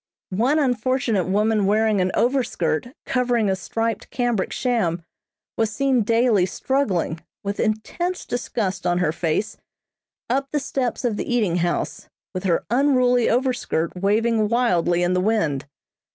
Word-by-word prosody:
One 245 +10 +2
unfortunate 250 - +1
woman 210 +1 +2
wearing 215 -1 +2
an 185 - +1
overskirt 240 - 0 0.2
covering 245 -5 +1
a - - +1
striped 225 +3 -3
cambric 240 -6 -1
sham, 190 -10 0 0.5
was 225 -1 +2
seen 265 +1 +2
daily 225 -3 +3
struggling, 195 - -1 0.2
with 200 0 -3
intense 290 +12 -2
disgust 195 -7 -2
on 175 0 +2
her 180 -4 +1
face, 170 +5 -2 0.7
up 270 +3 0
the 295 - 0
steps 260 -3 -2
of 225 -4 0
the - - -3
eating 200 -8 +1
house, 175 0 -2 0.3
with 185 +1 -4
her 170 -3 +1
unruly 250 -2 +3
overskirt 245 -10 0
waving 215 +3 +2
wildly 175 -8 +2
in 175 +1 +1
the 180 - +2
wind. 160 -10 0
220 Hz, 140 wpm, -22 LUFS, 185-245 Hz, 0.7 s, daily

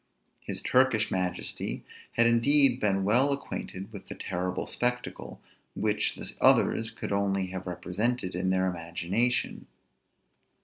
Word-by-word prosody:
His - - -5
Turkish 125 -4 +3
majesty 90 -1 -2 0.3
had 115 - +4
indeed 125 +2 +4
been 95 -3 +1
well 125 +8 +4
acquainted 100 -7 -6
with 100 - -9
that - - -8
terrible 90 0 -2
spectacle, 125 0 -3 0.4
which - - +1
the - - -6
others 110 0 +4
could 110 - -6
only 100 -2 0
have 95 0 -6
represented 95 +3 -2
in 90 +1 -1
their 95 0 +2
imagination. 90 +7 -1
100 Hz, 125 wpm, -28 LUFS, 95-120 Hz, 0.4 s, had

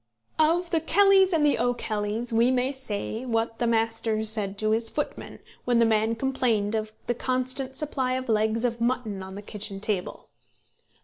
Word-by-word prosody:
"Of 335 +3 +2
The 330 - +3
Kellys 390 +2 +4
and 315 -3 +2
the 290 - +2
O'Kellys 225 -1 -1
we 230 +2 +4
may 255 +1 +1
say 225 -3 -4
what 225 -2 -2
the 240 - +1
master 225 -1 0
said 210 -3 +2
to 215 +1 0
his 225 +1 +2
footman, 295 - -5 0.3
when 245 -1 +1
the 230 - +5
man 220 0 +1
complained 230 -4 0
of 215 -1 -2
the 240 - 0
constant 255 +2 -2
supply 265 -3 -1
of 260 0 -3
legs 220 +1 +1
of 235 -1 -2
mutton 235 -5 -1
on 190 0 -8
the 205 - -8
kitchen 205 -1 -5
table. 200 -3 -3
230 Hz, 175 wpm, -26 LUFS, 215-260 Hz, 0.3 s, the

